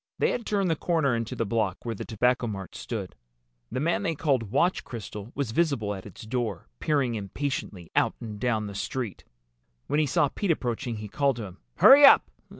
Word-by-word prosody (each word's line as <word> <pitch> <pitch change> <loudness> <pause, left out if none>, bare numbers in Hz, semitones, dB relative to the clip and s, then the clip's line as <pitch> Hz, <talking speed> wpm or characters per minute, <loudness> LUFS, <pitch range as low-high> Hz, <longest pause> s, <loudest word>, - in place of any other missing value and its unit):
They - - +2
had 235 - -4
turned 195 -4 +1
the - - +2
corner 155 -6 +1
into 115 -1 -3
the 115 - -1
block 110 -3 -1
where 115 - -2
the 100 - -6
Tobacco 125 +2 +1
Mart 95 -3 -6
stood. 105 -6 -5 0.6
The - - -2
man 165 +5 +1
they 165 - -1
called 135 -8 0
Watch 175 - +1
Crystal 105 -1 -8
was 135 -5 -2
visible 130 -8 +1
at 95 0 -8
its 100 - -11
door, 110 -5 -3
peering 140 -6 +1
impatiently 105 - -4
out - - +2
and 105 -3 -7
down 110 -2 0
the 100 - -6
street. 115 0 -4 0.6
When 145 - 0
he 155 - +2
saw 140 +2 +2
Pete 200 +6 -3
approaching 120 -5 -1
he 105 0 -6
called 140 +4 +1
to 115 -2 -5
him. 95 -1 -11 0.2
"Hurry 280 +2 +8
up! 275 - +8
120 Hz, 200 wpm, -27 LUFS, 105-145 Hz, 0.6 s, Hurry